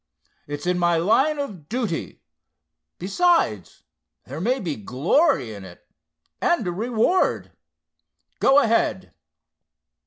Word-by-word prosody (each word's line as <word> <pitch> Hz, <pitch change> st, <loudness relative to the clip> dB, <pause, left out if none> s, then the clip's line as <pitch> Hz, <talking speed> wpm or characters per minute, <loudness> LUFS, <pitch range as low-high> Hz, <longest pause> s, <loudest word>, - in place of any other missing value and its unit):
It's 145 Hz, +1 st, -6 dB
in 180 Hz, 0 st, 0 dB
my 175 Hz, -1 st, +2 dB
line 265 Hz, -, +2 dB
of 195 Hz, -, -6 dB
duty—besides, 95 Hz, -, -3 dB, 0.4 s
there 140 Hz, +5 st, -7 dB
may 250 Hz, +7 st, 0 dB
be 165 Hz, -6 st, -3 dB
glory 130 Hz, -, +1 dB
in 100 Hz, -2 st, -10 dB
it, 90 Hz, -2 st, -14 dB, 0.6 s
and 345 Hz, -, +1 dB
a 175 Hz, -, -1 dB
reward. 230 Hz, -, 0 dB, 0.9 s
Go 270 Hz, -, +4 dB
ahead!" 230 Hz, -7 st, +1 dB
180 Hz, 100 wpm, -23 LUFS, -, 0.9 s, Go